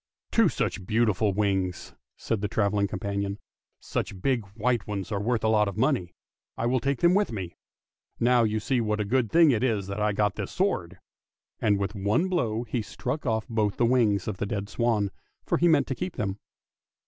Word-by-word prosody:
" - - -56
Two 225 -6 +4
such 100 - -2
beautiful 110 -2 +2
wings," 95 -3 -1 0.2
said 115 -3 -2
the 105 - 0
travelling 100 0 +1
companion. 100 0 -3 0.3
" - - -67
Such 95 - -4
big 125 +2 +1
white 120 0 0
ones 100 -1 -4
are 100 -1 -1
worth 115 +1 0
a - - +3
lot 105 -1 +3
of 100 0 -5
money; 115 - 0 0.4
I 115 - -1
will 125 +2 +2
take 140 +2 -1
them 175 +1 +5
with 205 +2 +2
me. 95 -6 -5 0.6
Now, 120 0 +4
you 110 0 +1
see 125 +3 0
what 105 -1 -1
a 105 - 0
good 120 +1 +1
thing 165 -3 +6
it 115 -4 +1
was 110 -6 +1
that 100 +2 -4
I 105 0 +2
got 105 +1 0
this - - -4
sword! - - -1 0.3
" - - -65
and 105 -2 +3
with 100 +1 -2
one 105 - +1
blow 120 -11 0
he 120 0 -2
struck 125 +7 -4
off 110 -1 0
both 110 -3 0
the 120 - +3
wings 115 -6 +2
of 105 -3 -3
the 100 - -2
dead 100 0 -3
swan, 110 -5 0 0.3
for - - +1
he 175 - +4
meant 155 -4 +4
to 135 - -2
keep 180 +6 -5
them. 100 -1 -3
110 Hz, 215 wpm, -27 LUFS, 100-125 Hz, 0.6 s, thing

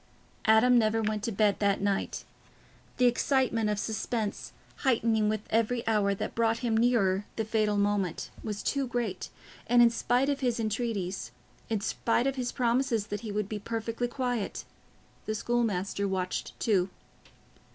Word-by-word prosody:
Adam 240 +3 +6
never 220 0 +2
went 215 0 -1
to 230 +2 -2
bed 205 -1 +2
that 200 -1 +2
night. 200 -1 -1 0.7
The 250 - +4
excitement 245 -2 +2
of 210 - 0
suspense, 220 0 -3 0.3
heightening 225 -5 +2
with 215 -1 -1
every 230 +2 +1
hour 205 -3 +2
that - - -4
brought 225 -1 +2
him 225 -2 +1
nearer 210 -4 +2
the 220 - -1
fatal 215 -1 +1
moment, 200 -4 0
was 210 -1 -4
too 275 -2 0
great, 235 -6 -3 0.4
and 245 +1 +4
in 235 -1 +7
spite 245 +3 +1
of 285 -1 0
his 245 -3 0
entreaties, 210 - -2 0.4
in 220 -3 0
spite 230 +4 0
of 270 0 0
his 250 -2 -2
promises 240 -2 +1
that 205 - -3
he 220 -3 -5
would 210 -1 -1
be 210 0 -4
perfectly 230 +2 -3
quiet, 245 -3 -3 0.6
the 215 - -1
schoolmaster 205 -4 0
watched 185 -1 -3
too. 195 -4 +2
220 Hz, 155 wpm, -29 LUFS, 205-240 Hz, 0.7 s, in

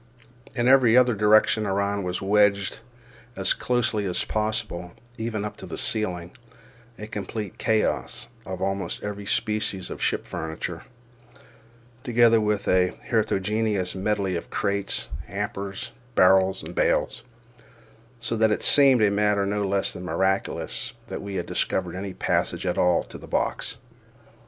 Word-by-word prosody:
In 120 -1 +1
every 130 -3 +6
other 125 -1 +5
direction 105 0 +4
around 100 +1 0
was 90 +1 -3
wedged 100 0 +2 0.6
as - - +2
closely 120 -4 0
as 90 -2 0
possible, 110 -5 -2 0.3
even 110 -2 -2
up 105 - -6
to - - -9
the - - -6
ceiling, 90 -5 0 0.7
a 105 - -7
complete 105 -1 -6
chaos 110 -1 0 0.2
of 95 -3 -5
almost 95 -2 -2
every 100 -1 -5
species 105 -4 -1
of - - -7
ship - - 0
furniture, 80 +2 -5 1.2
together 120 -3 +4
with 105 -1 -1
a 90 0 +2
heterogeneous 105 -4 0
medley 100 -1 -1
of 85 - -5
crates, 100 -1 -1 0.2
hampers, 100 -1 -5 0.2
barrels, 95 +1 +4
and - - -8
bales, - - +1 1.0
so 115 0 -2
that 110 0 +3
it 105 - -1
seemed 135 -5 +7
a 105 - +4
matter 105 0 +2
no 100 +1 -1
less 100 0 0
than - - -8
miraculous 95 +1 -1 0.2
that - - -5
we 100 -1 -6
had 90 - -2
discovered 90 -2 -1
any 95 0 -5
passage - - -1
at - - 0
all 90 -1 +3
to - - -11
the - - -12
box. - - -2
100 Hz, 140 wpm, -25 LUFS, 95-110 Hz, 1.2 s, seemed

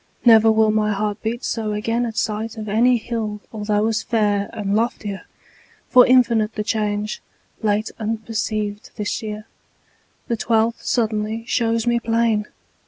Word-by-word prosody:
Never 225 -1 +7
will 220 0 +3
My 215 0 +1
heart 205 0 -2
beat 235 +3 -3
so 220 -2 -2
again 230 +3 -1
at 225 - -7
sight 220 +1 -2
Of 215 -1 -6
any 240 +4 +3
hill 220 -2 -4
although 210 -1 0
as 225 -1 0
fair 205 -3 0
And 200 -1 -2
loftier. 215 -3 -2 0.6
For 250 -1 +7
infinite 235 -4 +3
The 210 - -2
change, 210 -1 -2 0.4
late 215 0 0
unperceived, 215 -1 -3
this 210 +3 -3
year, 215 -1 -6 0.8
The 235 - -1
twelfth, 225 +1 +1
suddenly, 220 -1 -1
shows 230 -2 0
me 240 0 +2
plain. 225 -2 +1
220 Hz, 145 wpm, -21 LUFS, 210-230 Hz, 0.8 s, Never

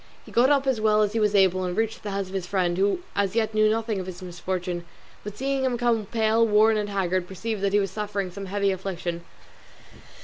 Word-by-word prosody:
He - - -13
got 245 +3 +4
up 280 -1 +3
as 260 -5 0
well 215 0 +4
as 210 0 -1
he 225 - 0
was 210 -1 +2
able 185 -1 +4
and 180 0 -3
reached 225 0 -1
the 210 - -5
house 195 -1 -2
of - - -11
his 190 -2 -3
friend, 180 -3 0
who 200 - +1
as 200 0 0
yet 220 -1 +1
knew 215 0 +4
nothing 220 -2 -1
of 185 - -5
his 185 0 -8
misfortune, 180 0 -4 0.4
but 210 0 -7
seeing 270 0 -1
him 255 -2 0
come 230 -3 +1
pale, 225 0 +2
worn, 220 0 +4
and 210 -1 -1
haggard, 185 -2 -1
perceived 210 +3 -4
that 200 0 +1
he 205 - +5
was 195 -2 -1
suffering 205 -3 -3
some 195 +1 -7
heavy 200 +1 +1
affliction. 175 -2 -4
205 Hz, 235 wpm, -25 LUFS, 185-220 Hz, 0.4 s, he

